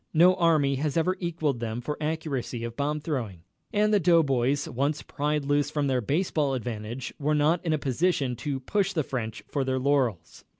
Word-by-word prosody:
No 175 +3 +7
army 155 -6 +2
has 150 +2 -1
ever 180 +3 +2
equalled 160 -7 -1
them 115 0 -3
for 150 +5 -3
accuracy 150 -6 -3
of 115 0 -5
bomb 150 +3 -1
throwing, 115 - -4 0.3
and 210 +1 +2
the 205 - +5
doughboys, 145 -6 +3
once 140 +5 -1
pried 150 0 -1
loose 145 0 +2
from 150 -1 -1
their 130 -2 +1
baseball 145 - 0
advantage, 120 0 -5
were 150 +1 +1
not 155 +3 +2
in 165 - 0
a 155 - +2
position 140 -1 0
to 135 +2 -3
push 195 +7 0
the 155 - +1
French 115 -5 -4
for 140 - -1
their 130 0 0
laurels. 130 -10 0
145 Hz, 185 wpm, -27 LUFS, 130-160 Hz, 0.3 s, No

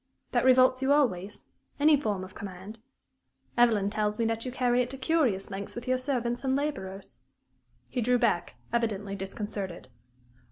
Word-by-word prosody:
That 245 0 +2
revolts 255 0 +5
you 265 +1 +2
always 210 -9 +1 0.3
any 300 +1 +6
form 210 -9 -1
of 185 - -10
command? 200 +3 -8 0.8
Evelyn 220 -5 +3
tells 210 0 -1
me 230 - +1
that 225 0 -1
you 255 - -3
carry 250 -1 +2
it 245 - -2
to 270 - -7
curious 260 - +1
lengths 195 +1 -5
with 240 +1 -7
your 255 0 +2
servants 245 -2 -1
and 265 0 +1
laborers." 195 - -4 0.7
He 250 - -2
drew 245 +2 +3
back, 230 -8 0 0.2
evidently 205 -4 -1
disconcerted. 195 -1 -5
235 Hz, 160 wpm, -28 LUFS, 200-255 Hz, 0.8 s, any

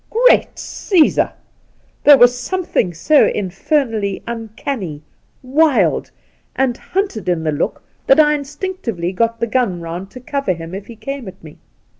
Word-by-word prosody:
Great - - +3
^sesar 355 -6 +2
1 - - -24 0.7
there 290 -1 +9
was 245 0 +6
something 330 - -1
so 185 - +4
infer 210 - 0
nally 205 -4 -3
uncanny, 220 - -5 0.4
wild, 285 +2 +2 0.5
and 260 -2 +1
hunted 365 - -3
in 170 -2 0
the 155 - 0
look 150 +2 -2 0.2
that 270 - +6
I 300 -1 +5
instinctively 285 - -4
got 230 +3 0
the 235 - +1
gun 230 -6 0
round 170 +3 -6
to 255 - -11
cover 275 -4 -2
him 165 0 -9
if 195 +1 -6
h^ 230 -2 -12
came 275 0 -6
at 190 -2 -11
me. 155 -2 -12
235 Hz, 155 wpm, -18 LUFS, 185-285 Hz, 0.7 s, there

